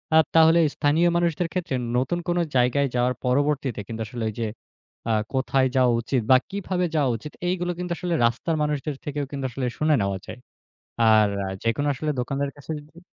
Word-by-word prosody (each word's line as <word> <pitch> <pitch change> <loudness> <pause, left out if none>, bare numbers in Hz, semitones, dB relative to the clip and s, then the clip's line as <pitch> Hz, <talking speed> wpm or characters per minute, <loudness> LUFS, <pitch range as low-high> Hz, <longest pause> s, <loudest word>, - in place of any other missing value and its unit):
আ - - +8 0.2
তাহলে 165 +1 +6 0.2
স্থানীয় 155 +4 +3
মানুষদের 170 0 0
ক্ষেত্রে 175 -7 -2 0.2
নতুন 135 +8 0
কোন 175 0 +1 0.2
জায়গায় 125 +3 +3
যাওয়ার 125 +1 +2
পরবর্তীতে 135 -2 +1
কিন্তু 115 0 -5
আসলে 120 -3 -5
ওই - - -7
যে, 115 - 0 0.6
আ - - +3 0.2
কোথায় 130 0 +2
যাওয়া 125 -2 +4
উচিত 125 +1 0
বা 130 - +9
কিভাবে 190 -2 -2
যাওয়া 140 -5 +2
উচিত? 150 +7 -9 0.2
এগুলো 180 -1 -1
কিন্তু 180 -1 -4
আসলে 175 +1 -1
রাস্তার 120 +8 0
মানুষদের 150 -1 -2
থেকেও 145 -1 -2
কিন্তু 135 -2 -4
আসলে 130 +1 -3
শুনে 155 -1 +3
নেওয়া 100 -1 -1
যায়। 120 - -9 0.7
আর 110 -1 +6 0.4
যেকোনো 115 +6 0
আসলে 150 +4 -2
দোকানদারের 140 +3 -2
কাছে 145 - -11
যদি 150 +3 -15
140 Hz, 180 wpm, -24 LUFS, 125-160 Hz, 0.7 s, বা